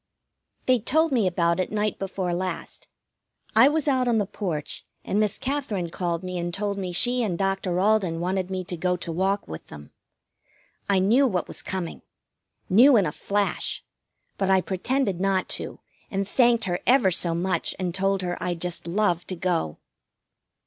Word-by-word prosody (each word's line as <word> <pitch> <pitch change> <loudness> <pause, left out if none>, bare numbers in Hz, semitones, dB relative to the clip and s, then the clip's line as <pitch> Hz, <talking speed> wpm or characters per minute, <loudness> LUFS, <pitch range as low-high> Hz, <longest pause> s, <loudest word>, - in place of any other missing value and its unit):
They 255 -1 +4
told 315 +8 +2
me 230 -7 +2
about 170 -1 +1
it 185 - -1
night 210 0 -1
before 190 -2 -2
last. 180 -1 -4 0.7
I 260 - +8
was 300 0 +1
out 260 -3 +2
on 235 -2 +3
the 205 - +1
porch, 170 -7 -4 0.2
and 205 - 0
Miss 210 -2 +1
Katherine 240 - -2
called 175 -1 -2
me 180 -1 -4
and 175 0 -2
told 200 +2 -2
me 185 -2 -3
she 245 +7 +2
and 195 -7 -1
Doctor 195 -2 0
Alden 195 -5 +2
wanted 185 +1 -1
me 185 -1 -3
to 180 - -5
go 180 +2 0
to 170 - -5
walk 190 +4 0
with 80 0 -8
them. 75 -1 -11 1.0
I 200 - +4
knew 230 +9 +4
what 185 -7 -1
was - - -7
coming. 185 -3 -4 0.7
Knew 240 +7 +7
in 200 - +3
a 150 - -1
flash. 200 +5 -1 0.6
But 195 -1 +1
I 190 0 +5
pretended 195 +2 -1
not 190 0 +1
to, - - -4 0.3
and 195 -1 -2
thanked 235 0 +3
her 175 -1 -1
ever 245 -7 +5
so 170 -1 0
much, 185 +2 -1
and 180 -2 -2
told 195 +1 +1
her 175 0 -3
I'd 175 -1 -2
just 175 -1 -3
love 180 -1 +1
to 185 - -4
go. 165 - -1
190 Hz, 180 wpm, -25 LUFS, 175-215 Hz, 1.0 s, I